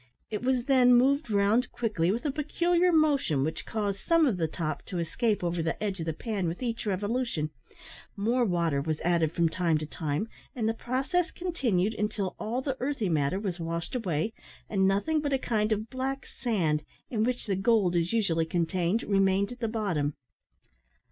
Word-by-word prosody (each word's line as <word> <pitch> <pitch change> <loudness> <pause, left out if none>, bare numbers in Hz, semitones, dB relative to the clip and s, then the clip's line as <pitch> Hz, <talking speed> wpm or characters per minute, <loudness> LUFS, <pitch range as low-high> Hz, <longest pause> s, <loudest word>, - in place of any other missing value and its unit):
It 210 - -2
was 250 -1 +1
then 255 -3 +6
moved 275 +2 +3
round 210 +4 +2
quickly 205 -8 0
with 235 +8 -3
a 290 - +1
peculiar 340 +5 +2
motion 285 - +3
which 160 +3 -3
caused 205 -3 -2
some 330 - +3
off 235 -10 +1
the 165 -2 +1
top 155 -1 -3
to 185 - -5
escape 180 +5 0
over 170 -1 0
the 165 0 -1
edge 200 -3 -2
of 165 - -4
the - - +1
pan 200 +1 -2
with 170 +9 -4
each 230 -2 -3
revolution; 205 -5 -1 0.7
more 235 +5 +2
water 170 -8 +1
was 155 +1 -2
added 170 -3 +2
from 170 0 +2
time 165 -1 +1
to 155 - -4
time, 150 +5 -2 0.3
and 225 -3 0
the 225 - +2
process 270 +10 0
continued 230 - 0
until 210 -3 -2
all 235 +4 -2
the 265 -1 -2
earthy 260 -7 -1
matter 155 +3 +1
was 190 -4 -3
washed 165 0 -3
away, 195 - -1 0.3
and 190 -2 +2
nothing 250 +11 +1
but 285 -2 -1
a - - +4
kind 220 -4 0
of 215 +1 -1
black 270 +1 -3
sand, 170 - -1 0.3
in 220 -3 +1
which 245 +1 -1
the 200 -4 0
gold 195 -2 +2
is 170 0 +1
usually 175 -8 +1
contained, 175 +5 0
remained 195 0 +2
at 245 - -8
the 230 - -1
bottom. 180 -10 -1
210 Hz, 190 wpm, -28 LUFS, 170-245 Hz, 0.7 s, then